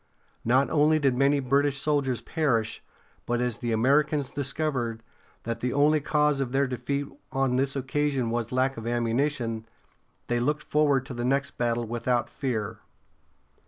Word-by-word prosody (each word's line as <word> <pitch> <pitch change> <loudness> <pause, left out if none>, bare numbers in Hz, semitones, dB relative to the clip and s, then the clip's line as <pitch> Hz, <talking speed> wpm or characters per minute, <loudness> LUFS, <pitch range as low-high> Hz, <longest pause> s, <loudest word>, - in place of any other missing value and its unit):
Not 130 +4 +3
only 155 +1 +4
did 135 -4 +2
many 140 +2 +3
British 140 +1 +1
soldiers 140 -4 0
perish, 115 -9 -1 0.4
but 120 0 0
as 125 -2 -1
the 120 -1 -2
Americans 140 +5 +2
discovered 135 -5 -2 0.4
that 115 0 -3
the 125 0 -1
only 150 +2 +3
cause 150 -1 +2
of 130 -3 -2
their 135 +1 +2
defeat 135 +2 -3 0.2
on 135 -2 +1
this 135 +1 0
occasion 135 -2 0
was 120 -1 -2
lack 130 +1 +1
of 115 0 -6
ammunition, 120 -1 -1 0.6
they 120 0 0
looked 150 +5 0
forward 145 -3 +2
to 135 - -7
the 120 0 -4
next 140 +2 +1
battle 120 -1 0
without 120 +1 -1
fear. 115 -6 -3
130 Hz, 155 wpm, -27 LUFS, 120-145 Hz, 0.6 s, only